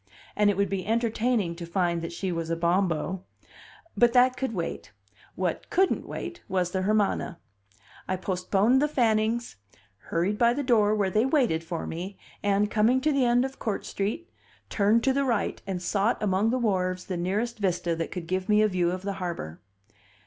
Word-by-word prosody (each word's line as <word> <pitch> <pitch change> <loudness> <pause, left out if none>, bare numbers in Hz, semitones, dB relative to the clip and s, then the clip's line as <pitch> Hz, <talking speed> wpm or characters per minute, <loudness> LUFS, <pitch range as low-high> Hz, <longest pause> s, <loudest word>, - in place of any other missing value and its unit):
And 210 0 +4
it 200 - 0
would 200 0 +2
be 190 0 -3
entertaining 225 -3 0
to 170 - -6
find 170 -1 0
that 165 - -5
she 185 +2 -3
was 165 -1 -3
a 165 - 0
Bombo; 175 +1 0 0.7
but 240 -1 +4
that 255 +1 +5
could 265 -1 -2
wait; 175 - -4 0.4
what 180 -2 -2
couldn't 380 +1 +1
wait 345 0 -6
was 180 -2 0
the 190 - -1
Hermana. 200 -3 0 0.7
I 185 - 0
postponed 195 +7 +1
the 295 - +3
Fannings, 230 - 0 0.5
hurried 185 +5 0
by 235 0 +4
the 285 - -1
door 215 -5 +3
where 200 -3 0
they 220 +6 +2
waited 250 - +2
for 165 0 -4
me, 185 +4 -6 0.2
and, 205 +1 +1
coming 225 +4 +3
to 305 +3 +2
the 275 -3 +2
end 245 +1 +3
of 270 0 -7
Court 215 -3 -3
Street, 215 +13 -3 0.4
turned 215 +3 +3
to 265 - +3
the 280 +1 +1
right 235 -6 -1
and 190 -2 -2
sought 200 +5 +1
among 200 +2 +2
the 250 - +1
wharves 185 -6 0
the 185 - -4
nearest 210 +7 -2
vista 180 -3 0
that 165 0 -3
could 180 -3 -6
give 185 +3 -2
me 210 0 +5
a - - +4
view 180 -3 +1
of 185 +1 -4
the 200 0 -2
harbor. 165 - -5
200 Hz, 190 wpm, -27 LUFS, 180-235 Hz, 0.7 s, that